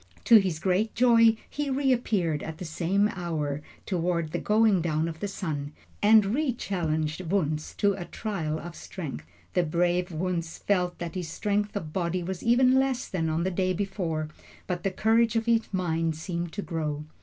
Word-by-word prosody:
To 230 - +8
his 185 -6 +1
great 190 +6 0
joy 230 -2 +5
he 290 -1 -3
reappeared 235 - +1
at 160 -1 -6
the 180 - -6
same 180 +5 +1
hour, 155 -6 -3 0.2
toward 170 -3 -1
the - - -1
going 210 -3 +3
down 160 -1 0
of 160 -1 -6
the 205 - -2
sun, 155 -7 -4 0.3
and 210 -1 +5
re 285 -1 +1
challenged 160 -7 -2
Wunzh 155 -5 -1
to 205 -1 +3
a 185 -2 -6
trial 170 -9 -3
of 170 +1 -8
strength. 135 - -7 0.3
The 180 - +3
brave 175 +2 +1
Wunzh 170 0 -2
felt 180 -3 +1
that 170 -2 -5
his 180 -3 -4
strength 205 +4 -1
of 160 -6 -4
body 180 -1 -1
was 185 0 -4
even 255 +2 +4
less 265 -2 0
than 165 -4 -1
on 160 +2 0
the 190 - 0
day 185 +1 +1
before, 175 -5 -2 0.4
but 180 -2 -3
the 195 - 0
courage 225 +4 +2
of 225 0 +1
his 230 -1 +1
mind 165 -4 0
seemed 170 +1 -4
to 205 - -4
grow. 150 -3 -3
180 Hz, 180 wpm, -27 LUFS, 160-210 Hz, 0.4 s, To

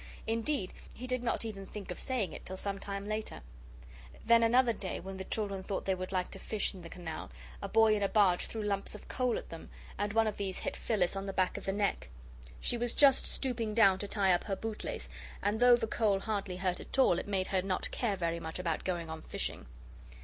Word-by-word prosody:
Indeed, 225 -2 -1 0.2
he 250 - -7
did 255 -1 -1
not 235 -1 -1
even 195 -3 -6
think 200 -2 -7
of 180 - -5
saying 250 -7 -1
it - - -8
till 190 - -6
some 200 0 -3
time 200 0 -5
later. 215 - -3 0.8
Then 230 0 +6
another 235 +1 +5
day 195 -3 -4
when 190 +1 -7
the 190 - -4
children 200 -3 -1
thought 195 +1 -3
they 190 - +2
would 185 0 -4
like 185 -1 -1
to - - -6
fish 215 -1 -1
in 185 - -10
the 170 - -9
canal, 165 - -6 0.3
a - - -4
boy 220 -1 +5
in 205 - -1
a 200 - +2
barge 195 -5 +4
threw 220 -1 -4
lumps 200 0 -1
of 210 - -11
coal 250 -2 0
at - - -7
them, 165 - -9 0.3
and 205 0 0
one 225 0 +4
of 215 -1 -2
these 195 -2 -2
hit - - -3
Phyllis 195 -5 +1
on 195 0 -3
the 195 - -3
back 185 -1 +1
of - - -6
the 195 - +1
neck. 200 - -1 0.5
She 240 - 0
was 240 0 0
just 275 -2 +6
stooping 230 -5 -1
down 195 -5 +6
to 205 - -3
tie 195 -3 +3
up 175 - +1
her 200 - -1
bootlace 220 +1 -4 0.4
and 205 +2 +1
though 245 0 +8
the 235 - -1
coal 215 -3 +2
hardly 195 -3 -2
hurt 185 -1 0
at - - -4
all 220 -10 +5
it - - -6
made 195 -2 0
her 190 -1 +1
not 185 -1 -1
care 220 -5 0
very 170 -1 -1
much 160 0 -5
about 170 -3 -1
going 175 -3 -2
on 160 0 -6
fishing. - - -4
200 Hz, 235 wpm, -32 LUFS, 185-225 Hz, 0.8 s, though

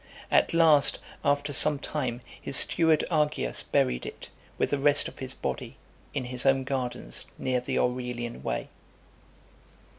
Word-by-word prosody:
At - - +3
last, 160 -4 +4 0.3
after 145 0 0
some 150 +2 +7
time, 130 -4 -4 0.2
his 135 - +1
steward 160 -2 +4
Argius 150 - 0
buried 60 -1 0
it, - - -10 0.3
with - - -1
the 145 - 0
rest 145 +1 +3
of - - -12
his 130 0 -3
body, - - -5 0.3
in 135 -3 -4
his 125 0 0
own 135 -1 +2
gardens 130 - -4
near 130 -1 -1
the 125 - -4
Aurelian 125 -1 -3
Way. - - -4
135 Hz, 145 wpm, -27 LUFS, 125-145 Hz, 0.3 s, some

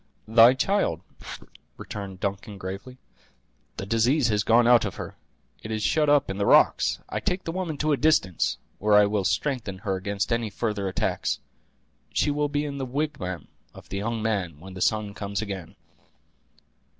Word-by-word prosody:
"Thy 115 +3 +7
child," 160 - +1 0.8
returned 100 -3 -7
Duncan, 100 +1 -4
gravely; 95 +7 -7 0.8
"the - - -4
disease 115 +5 +2
has 105 -1 +1
gone 115 +2 +4
out 120 -1 +6
of 100 - -3
her; - - -7 0.5
it 110 - -8
is 110 -1 -2
shut 150 +5 +2
up 145 -1 +4
in 95 - -5
the 100 - +1
rocks. - - +4
I - - -2
take 180 +1 -2
the 165 - -3
woman 170 -4 -3
to 155 +2 0
a 145 - +3
distance, 135 - +2 0.2
where 105 0 +3
I 105 0 +7
will 100 -1 0
strengthen 125 -9 -1
her 95 -2 0
against 100 +3 -2
any 115 -2 -1
further 105 -2 -2
attacks. 95 - -1 0.7
She 145 - +1
will 145 0 0
be 145 +1 -1
in 140 -1 -5
the 135 - -2
wigwam 130 - -3 0.3
of - - -13
the 95 - -4
young 110 +2 -2
man 95 -9 -1
when 95 +3 -11
the 90 - -8
sun 105 -2 +1
comes 100 -1 -4
again." 95 -5 -5
110 Hz, 175 wpm, -26 LUFS, 100-135 Hz, 0.8 s, Thy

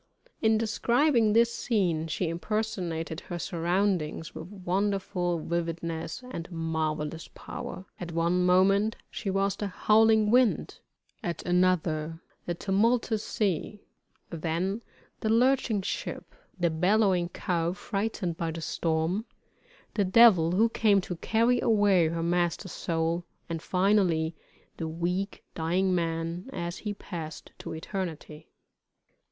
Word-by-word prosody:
In 220 -1 +4
describing 230 +1 +2
this 235 +1 +4
scene, 185 -10 0
she 165 +3 -1
impersonated 170 -3 -2
her 175 - -6
surroundings 175 -2 -1
with 160 +1 -7
wonderful 190 -2 -1
vividness 165 +4 -3
and 170 -5 -6
marvellous 160 -1 -2
power. 185 - -7
At 175 -1 -5
one 170 +2 +1
moment 195 +4 +4 0.2
she 200 - -4
was 195 +1 +1
the 205 - -3
howling 215 +2 +4
wind; 250 -2 +2 0.4
at 170 -2 -4
another 165 -3 +1 0.3
the 175 - -1
tumultuous 220 +4 +1
sea 200 0 -2 0.5
then 170 +6 -2 0.4
the 220 - -1
lurching 235 -3 +3
ship - - -4 0.3
the 170 -2 +2
bellowing 180 +1 +2
cow 170 -2 -1
frightened 195 -3 -3
by 165 -1 -2
the 165 +1 -5
storm 165 +6 -1 0.7
the 205 - +2
devil, 185 -4 +6
who 220 +5 +4
came 210 -3 +3
to 180 - -5
carry 230 +6 +2
away 205 -6 +4
her 165 +1 -2
master's 175 +1 0
soul, 165 0 -1 0.2
and 165 -2 -4
finally 180 -4 +2 0.4
the 165 - -3
weak, 180 +5 -2
dying 180 +3 +1
man, 165 +3 -2
as 170 -7 -4
he 210 -1 -3
passed 165 -6 -7
to - - -6
eternity. 160 -3 -6
180 Hz, 120 wpm, -28 LUFS, 165-210 Hz, 0.7 s, devil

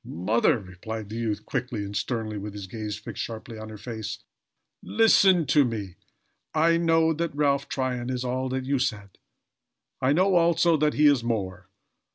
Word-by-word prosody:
"Mother!" 115 - +1
replied 105 +2 -7
the 110 - -6
youth, 110 -2 -2
quickly 125 -5 -3
and 100 +1 -7
sternly, 110 -3 -2
with 105 0 -6
his 100 -2 -7
gaze 105 +2 -5
fixed - - -7
sharply 115 0 -7
on 110 0 -8
her 110 - -9
face, 110 0 -6 0.6
"listen 195 -6 +4
to 145 +2 +4
me. 105 -7 -4 0.6
I 165 +2 +4
know 165 -1 +3
that 165 -1 -3
Ralph 140 -2 +1
Tryon 125 -2 -2
is 125 -1 -2
all 130 +1 -2
that 130 0 -3
you 135 0 0
said. 105 -6 -3 0.8
I 130 +1 +3
know, 185 +6 +3
also, 170 -1 +4
that 150 0 +1
he 150 - +4
is 140 -5 +5
more. 95 -5 -3
125 Hz, 175 wpm, -26 LUFS, 110-150 Hz, 0.8 s, is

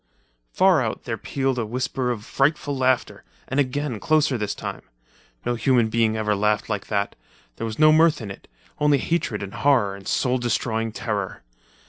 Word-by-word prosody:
Far - - +4
out, - - -3
there - - -3
pealed 135 -2 -2
a 115 - -1
whisper 130 +2 -2
of 110 -3 -3
frightful 145 +1 0
laughter. 130 -2 0 0.2
And 135 - -1
again, 140 -3 -1
closer 155 -2 +2
this 105 -3 -2
time. - - -6 0.6
No 120 - +1
human 120 -1 +2
being 110 -1 +1
ever 105 -1 +1
laughed 105 +1 0
like 105 -2 -3
that—there 100 - -5
was 110 - -6
no 155 0 +6
mirth 160 0 +4
in 105 -5 -6
it, - - -12 0.3
only 150 -1 +4
hatred 145 -9 -1
and 95 - -7
horror 125 -9 +2
and 100 -1 -12
soul 130 -1 +1
destroying 115 -1 -1
terror. 105 -4 -4
120 Hz, 170 wpm, -23 LUFS, 105-135 Hz, 0.6 s, no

